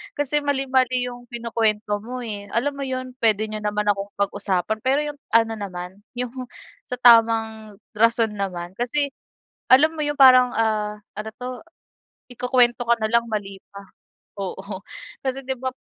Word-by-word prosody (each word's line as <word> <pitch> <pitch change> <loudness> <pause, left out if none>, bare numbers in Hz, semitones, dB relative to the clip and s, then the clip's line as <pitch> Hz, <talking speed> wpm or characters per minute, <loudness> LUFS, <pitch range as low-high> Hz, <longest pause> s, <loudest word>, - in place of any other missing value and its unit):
Kasi 290 +1 0
mali-mali 260 -3 +1
'yong 245 0 -9
kinukwento 220 -3 -1
mo, 250 +2 -6
eh. 205 -3 -6
Alam 280 +4 0
mo - - -2
'yon, 255 0 -4
puwede 215 -2 +3
niyo 215 0 -5
naman 210 0 -1
akong 200 0 -5
pag-usapan 200 0 0
pero 265 +2 +3
'yong 295 -1 -6 0.2
ano 225 0 +4
naman, 180 -1 -7 0.2
'yong 245 -1 -3 0.6
sa - - -3
tamang 225 -3 +4 0.2
rason 230 0 +3
naman. 185 -4 -4
Kasi, 280 +4 0 0.6
alam 300 +5 +6
mo 305 - -2
'yong 290 0 -3
parang, 255 -2 +8
ah 210 -2 0 0.2
ano 215 +1 -4
'to? 250 - -5 0.8
Ikukuwento 245 0 +2
ka 235 - +5
na 220 - +1
lang, 235 0 +4
mali 200 -2 -4
pa. 200 - -9 0.6
Oo. 195 0 -6 0.4
Kasi 265 0 -3
'di 265 - -1
ba 260 +1 -2
pa - - -15
230 Hz, 160 wpm, -23 LUFS, 210-255 Hz, 0.8 s, parang